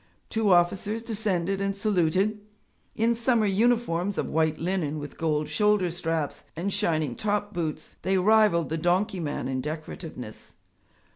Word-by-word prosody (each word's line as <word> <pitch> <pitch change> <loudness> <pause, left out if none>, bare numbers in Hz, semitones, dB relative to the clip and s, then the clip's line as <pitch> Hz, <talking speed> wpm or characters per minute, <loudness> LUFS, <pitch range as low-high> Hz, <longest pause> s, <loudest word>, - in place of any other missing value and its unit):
Two 220 -3 +2
officers 195 +5 +2
descended 195 -4 -1
and 195 0 -1
saluted. 200 +1 +1 0.6
In 230 +2 +2
summer 235 -1 +2
uniforms 205 -3 +1
of - - 0
white 160 0 +1
linen 165 -3 -1
with 145 -1 -7
gold 155 -2 0
shoulder 210 -4 +2
straps, 165 -3 -2
and 185 +5 -2
shining 155 - +1
top 210 0 -1
boots, 165 -4 -4
they 190 0 +1
rivalled 205 -4 +4
the 160 +1 -2
donkey 185 +4 +1
man 150 -5 -3
in 130 -1 -2
decorativeness. 155 -5 -7
185 Hz, 140 wpm, -27 LUFS, 160-210 Hz, 0.6 s, rivalled